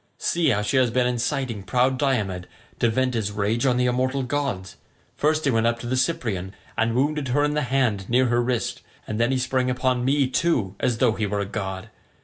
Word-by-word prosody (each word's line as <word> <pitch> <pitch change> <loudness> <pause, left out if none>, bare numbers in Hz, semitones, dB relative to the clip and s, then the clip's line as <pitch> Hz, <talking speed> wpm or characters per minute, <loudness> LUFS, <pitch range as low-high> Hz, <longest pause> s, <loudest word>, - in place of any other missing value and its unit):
See 170 -1 +1
how 105 0 +1
she 130 +6 0
has 130 -2 +4
been 125 +2 +1
inciting 125 -2 -1
proud 130 +5 +1
Diomed 105 -11 0 0.3
to 120 - +3
vent 130 +3 0
his 110 -3 -1
rage 105 +5 0
on 125 -1 +2
the 125 - +2
immortal 130 +2 0
gods. 125 - -3 0.4
First 155 +1 +1
he 140 - +3
went 115 -1 +2
up 115 0 +1
to 120 - -9
the 125 +2 -1
Cyprian 115 - -1 0.2
and 115 +1 +1
wounded 145 +2 0
her 140 +4 +2
in 150 0 +1
the 150 - +1
hand 125 -7 0
near 125 +2 +4
her 120 0 +2
wrist, 120 -1 -2 0.2
and 110 0 -4
then 120 +2 +2
he 130 - +1
sprang 130 0 0
upon 125 0 0
me 135 +1 +2
too 125 - 0
as 120 -2 0
though 115 - +3
he 110 -1 -2
were 100 +1 -2
a - - -2
god. 95 -2 -5
125 Hz, 220 wpm, -24 LUFS, 110-130 Hz, 0.4 s, has